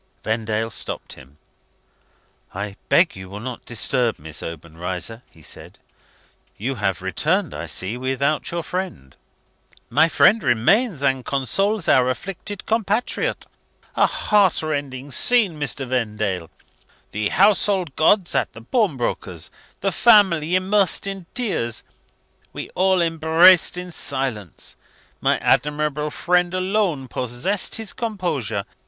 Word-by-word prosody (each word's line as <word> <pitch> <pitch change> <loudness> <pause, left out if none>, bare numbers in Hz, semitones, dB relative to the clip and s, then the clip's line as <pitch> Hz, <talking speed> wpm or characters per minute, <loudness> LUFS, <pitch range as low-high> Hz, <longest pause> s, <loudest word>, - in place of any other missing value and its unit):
Vendale 110 0 -1
stopped - - -4
him. 70 0 -16 1.2
"I 100 0 -4
beg 165 +6 +4
you 95 -1 -9
will 100 +2 -7
not 125 +2 -7
disturb 120 0 +1
Miss 80 +1 -6
Obenreizer," 85 +7 -5
he 80 -2 -20
said. - - -8 0.8
"You 125 +6 -2
have 95 -8 -2
returned, - - 0
I 85 +3 -6
see, 95 +8 -2
without 135 +4 -1
your 170 0 -3
friend?" 180 - -5 0.8
"My 165 - +4
friend 220 +6 +5
remains, 145 - +2
and 135 -2 +1
consoles 190 - 0
our 130 -1 +4
afflicted 195 +8 -5
compatriot. 225 +1 -1 0.5
A - - +4
heart 200 -6 +2
rending 140 -3 -4
scene, 200 - +3
Mr. 140 -1 -1
Vendale! 105 -8 -2 0.6
The 105 0 -1
household 195 -5 +3
gods 175 +4 +3
at 135 - 0
the 115 - -11
pawnbroker's 125 - -1 0.3
the 195 - +1
family 185 -8 +4
immersed 190 0 +2
in 195 -3 -5
tears. 175 - -2 0.7
We - - -7
all 185 -1 +2
embraced 165 +2 +5
in 180 0 -6
silence. 130 - -3 0.4
My - - +2
admirable 150 0 +1
friend 180 +3 +1
alone 185 -7 0
possessed 125 - -2
his 220 -3 -4
composure. 160 - -2
145 Hz, 120 wpm, -22 LUFS, 115-185 Hz, 1.2 s, friend